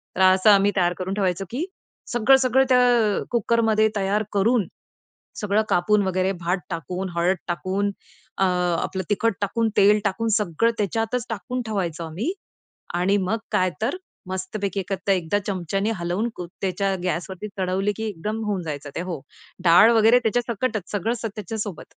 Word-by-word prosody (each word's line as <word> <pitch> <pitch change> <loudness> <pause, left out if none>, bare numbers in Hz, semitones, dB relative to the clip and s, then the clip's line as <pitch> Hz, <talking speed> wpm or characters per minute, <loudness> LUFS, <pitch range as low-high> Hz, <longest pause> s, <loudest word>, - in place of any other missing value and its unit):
तर - - -1
असं 190 +3 +4
आम्ही 200 0 +5
तयार 175 -1 +3
करून 185 +1 -3
ठेवायचं 190 -2 0
की 280 +9 -2 0.5
सगळं-सगळं 260 +2 +4
त्या 245 -4 +4
कुकरमध्ये 225 -1 +2
तयार 200 +1 +1
करून, 205 0 +2 0.7
सगळं 210 +1 +2
कापून 205 +4 +3
वगैरे 185 +1 +1
भात 175 +2 0
टाकून, 180 +3 -4
हळद 175 +3 +3
टाकून 190 +3 -1 0.5
अ, 195 - +4 0.4
आपलं 190 0 -3
तिखट 230 +2 +1
टाकून 225 +3 0
तेल 205 +2 +6
टाकून 205 +3 0
सगळं 210 +3 +1
त्याच्यातच 225 +4 -1
टाकून 240 +3 -3
ठेवायचो 175 -6 -2
आम्ही. 185 - -3 0.6
आणि 185 +3 +2
मग 225 +4 +1
काय 185 -3 +2
तर 250 +11 0 0.3
मस्तपैकी 190 +2 -3
एक 190 - -6 0.2
एकदा 185 +1 +2
चमच्याने 195 +2 -1
हलवून 175 +6 -1
त्याच्या 190 +2 -2
गॅसवरती 185 +2 -3
चढवली, 190 +2 0
की 220 - -4
एकदम 210 +5 -4
होऊन 205 -3 -1
जायचं 145 -2 -5
ते - - -2
हो. 175 -5 -5 0.4
डाळ 175 +7 +7
वगैरे 225 +2 +6
त्याच्यासकट 235 0 0
सगळं 225 +3 -1
त्याच्यासोबत. 205 -2 -5
200 Hz, 145 wpm, -23 LUFS, 185-225 Hz, 0.7 s, डाळ